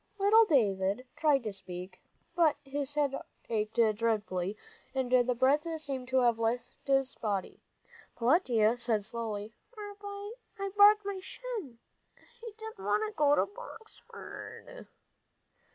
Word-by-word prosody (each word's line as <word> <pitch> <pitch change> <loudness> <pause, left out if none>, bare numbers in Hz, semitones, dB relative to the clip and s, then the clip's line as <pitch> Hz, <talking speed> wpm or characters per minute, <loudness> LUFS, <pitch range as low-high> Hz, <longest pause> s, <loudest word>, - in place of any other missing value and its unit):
Little 420 +3 +6
David 205 - +1
tried 290 -5 +3
to 215 -2 -3
speak, 180 -1 -8 0.3
but 330 -4 +4
his 280 +1 -3
head 290 -2 +1 0.4
ached 215 -1 -1 0.2
dreadfully, 205 -4 -1 0.4
and 260 -2 -1
the 250 -1 +4
breath 275 +6 +3
seemed 270 -4 -4
to 260 +1 +2
have 235 -2 +3
left 230 +2 -1
his 270 -1 +2
body. 200 -4 -3 0.6
Peletiah 240 - +3
said 225 -4 +1
slowly, 220 -2 -4 0.2
"I 410 0 -7
barked 415 0 +7
my 400 -1 -3
shin, 375 - -11 0.2
and 265 - -11 0.7
I 460 - -6
didn't 445 - -9
want 205 +2 +1
to 215 - -8
go 290 -1 +4
to - - +3
Boxford." - - -11
260 Hz, 130 wpm, -31 LUFS, -, 0.7 s, barked